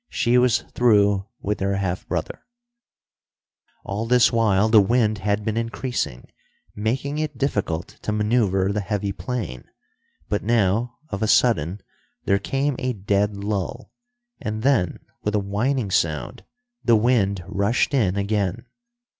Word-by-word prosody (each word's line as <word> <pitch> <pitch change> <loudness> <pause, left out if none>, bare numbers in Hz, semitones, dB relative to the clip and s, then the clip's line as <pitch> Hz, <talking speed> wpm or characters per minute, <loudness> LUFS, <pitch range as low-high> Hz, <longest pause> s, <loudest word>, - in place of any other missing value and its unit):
She 120 +1 +2
was 120 -2 +3
through 100 -4 +3
with 105 +1 -2
her 100 0 0
half 95 -2 -2
brother. 85 -3 -3 1.4
All 105 +3 -3
this 125 0 +5
while 110 -3 +3
the 110 -1 +6
wind 110 0 +2
had 105 +1 -1
been 110 0 -1
increasing, 115 - -3 0.5
making 130 +8 -2
it 155 -1 -3
difficult 100 - -1
to - - -2
maneuver 105 -3 +1
the 105 - -1
heavy 100 0 -2
plane; 95 - -5 0.6
but 105 - -1
now, 115 +1 +1
of 100 - -4
a 110 - +1
sudden 95 -5 +2 0.4
there 100 0 +3
came 135 +6 -1
a 125 0 -1
dead 100 0 0
lull, 100 -2 -4 0.5
and 110 -4 -4
then, 120 - +2 0.2
with 105 0 -1
a - - +3
whining 105 +3 -1
sound, 75 -7 -1 0.4
the 120 - +5
wind 105 -5 +2
rushed 100 +8 0
in 100 -8 +2
again. 100 -2 -1
105 Hz, 140 wpm, -23 LUFS, 100-120 Hz, 1.4 s, the